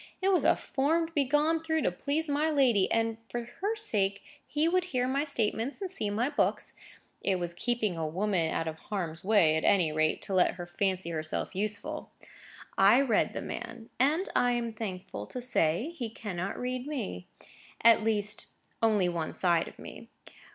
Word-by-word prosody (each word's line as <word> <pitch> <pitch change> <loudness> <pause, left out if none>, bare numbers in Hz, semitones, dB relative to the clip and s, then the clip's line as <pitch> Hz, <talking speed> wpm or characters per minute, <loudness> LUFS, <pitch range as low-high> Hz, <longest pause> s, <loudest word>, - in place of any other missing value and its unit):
It 385 - +2
was 365 - +3
a - - +5
form 315 +5 0
to 325 - -12
be 285 -3 +2
gone 300 +4 +2
through 320 -1 0
to - - +2
please 290 - -2
my 295 +2 +1
lady, 255 -10 +3
and, 225 0 +1
for 240 0 -3 0.2
her 415 +3 0
sake, 200 - 0 0.2
he 300 +2 +1
would 365 +1 +2
hear 255 -8 0
my 275 +2 +1
statements 245 -2 -1
and 385 -3 -4
see 215 - -2
my 220 +5 0
books. 290 0 0 0.5
It 195 - +1
was 175 -1 -3
keeping 220 -1 -1
a 160 - -1
woman 175 -1 0
out 165 - -1
of 160 0 -4
harm's 175 -6 -3
way, 190 -6 +4
at 160 - 0
any 180 -6 +4
rate, 155 0 +1
to 195 - -4
let 185 -1 +3
her 175 -1 -6
fancy 185 0 -1
herself 155 -1 -2
useful. 205 +1 -3 0.7
I 200 +6 +7
read 275 -4 +2
the - - -4
man. 225 0 -7
And, 305 +8 +3
I 245 0 +3
am 235 -1 -2
thankful 185 - -6
to - - -6
say, 240 - +1
he 240 -8 -4
cannot 195 -4 -4
read 250 +1 -3
me. 90 - -4 0.6
At 230 -1 +7
least, 210 -1 -1 0.3
only 215 -5 +3
one 170 -2 -2
side 170 -3 +2
of - - -12
me. - - -10
220 Hz, 185 wpm, -30 LUFS, 185-280 Hz, 0.7 s, I